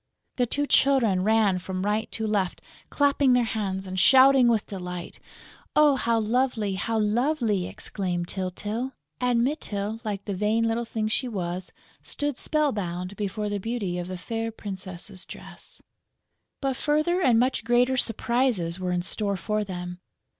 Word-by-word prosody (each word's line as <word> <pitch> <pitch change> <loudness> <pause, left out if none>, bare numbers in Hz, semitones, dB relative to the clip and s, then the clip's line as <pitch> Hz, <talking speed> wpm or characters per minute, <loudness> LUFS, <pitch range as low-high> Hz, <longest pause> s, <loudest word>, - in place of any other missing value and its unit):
The 245 -1 +2
two 290 +5 0
children 255 -10 +3
ran 210 -2 +3
from 185 +1 -4
right 210 +2 0
to 220 - -2
left 200 -4 0 0.3
clapping 280 -2 +3
their 250 -1 +4
hands 195 -4 -2
and 185 0 -3
shouting 260 +3 +7
with 225 -3 +2
delight. 180 -3 -7 0.6
"Oh, 300 -2 +6
how 235 -3 +1
lovely, 225 -2 0
how 225 +4 -1
lovely!" 220 -2 +1
exclaimed 180 -3 -3
Tyltyl. 205 +8 -3 0.3
And 245 -2 +2
Mytyl, 220 -6 -2
like 205 -3 -4
the 200 - -3
vain 210 +4 +1
little 230 +1 -1
thing 220 -1 -2
she 250 +4 0
was, 185 -4 -4 0.3
stood 290 -2 -2
spell 305 +2 +1
bound 180 -2 -4
before 210 +1 -3
the 205 0 -2
beauty 200 -4 -2
of 175 - -4
the 185 0 -5
fair 225 +4 -3
princess' 190 -2 -7
dress. - - -11 0.8
But 270 -2 -1
further 305 +5 +1
and 250 -8 +4
much 255 -1 +1
greater 245 +3 +3
surprises 235 -7 0
were 185 -1 -2
in 175 0 0
store 200 +1 +1
for 215 +3 -1
them. 180 -2 -6
215 Hz, 155 wpm, -26 LUFS, 190-245 Hz, 0.8 s, shouting